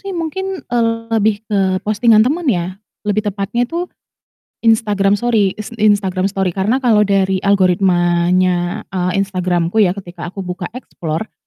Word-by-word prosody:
sih 395 Hz, -2 st, -6 dB
mungkin, 380 Hz, +3 st, -4 dB
eee, 235 Hz, -1 st, +1 dB, 0.2 s
lebih 215 Hz, -1 st, +1 dB
ke 195 Hz, -3 st, 0 dB
postingan 215 Hz, +1 st, +4 dB
teman 305 Hz, +5 st, -1 dB
ya, 185 Hz, -3 st, -1 dB, 0.2 s
lebih 210 Hz, 0 st, +1 dB
tepatnya 205 Hz, +5 st, -2 dB
itu 340 Hz, +4 st, -2 dB, 0.8 s
Instagram 210 Hz, -3 st, +2 dB
sori 215 Hz, -4 st, +1 dB
ins 215 Hz, +2 st, -8 dB
Instagram 205 Hz, -4 st, +1 dB
story 195 Hz, -2 st, -1 dB
karena 210 Hz, +9 st, 0 dB
kalau 210 Hz, -4 st, +4 dB
dari 195 Hz, -1 st, +1 dB
algoritmanya, 180 Hz, -1 st, +2 dB
eee, 180 Hz, -1 st, -1 dB
Instagram-ku 180 Hz, 0 st, -1 dB
ya 190 Hz, -3 st, +3 dB
ketika 175 Hz, -3 st, -8 dB
aku 190 Hz, +2 st, -6 dB
buka 180 Hz, 0 st, -5 dB
explore, 170 Hz, -6 st, -5 dB
200 Hz, 140 wpm, -17 LUFS, 185-225 Hz, 0.8 s, postingan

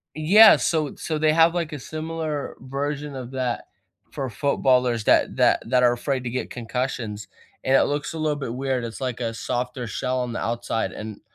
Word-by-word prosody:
Yeah. 200 Hz, +9 st, +8 dB
So 155 Hz, -4 st, 0 dB
so 155 Hz, -2 st, -3 dB
they 155 Hz, 0 st, +3 dB
have, 165 Hz, +1 st, +5 dB
like, 170 Hz, -2 st, -2 dB
a 145 Hz, -, -5 dB
similar 155 Hz, 0 st, -4 dB
version 140 Hz, +2 st, -4 dB
of 125 Hz, -1 st, -7 dB
that 130 Hz, -2 st, -3 dB, 0.4 s
for 135 Hz, -2 st, -4 dB
footballers 125 Hz, -4 st, +1 dB
that -, -, +3 dB
that -, -, +3 dB
that 125 Hz, -1 st, +3 dB
are 120 Hz, 0 st, +5 dB
afraid 130 Hz, +1 st, -2 dB
to -, -, -1 dB
get 125 Hz, -, -3 dB
concussions, 115 Hz, -3 st, -4 dB, 0.4 s
and 135 Hz, +1 st, +3 dB
it -, -, +6 dB
looks 145 Hz, +2 st, -2 dB
a 160 Hz, -, -5 dB
little 155 Hz, -1 st, 0 dB
bit 135 Hz, -5 st, -5 dB
weird, 130 Hz, -1 st, -1 dB
it's 115 Hz, -1 st, -6 dB
like 125 Hz, -2 st, -3 dB
a 115 Hz, -1 st, -2 dB
softer 125 Hz, +1 st, -3 dB
shell 130 Hz, +3 st, -2 dB
on 125 Hz, -2 st, -3 dB
the -, -, -3 dB
outside, 115 Hz, -1 st, -2 dB
and 110 Hz, -1 st, -8 dB
130 Hz, 195 wpm, -24 LUFS, 120-150 Hz, 0.4 s, Yeah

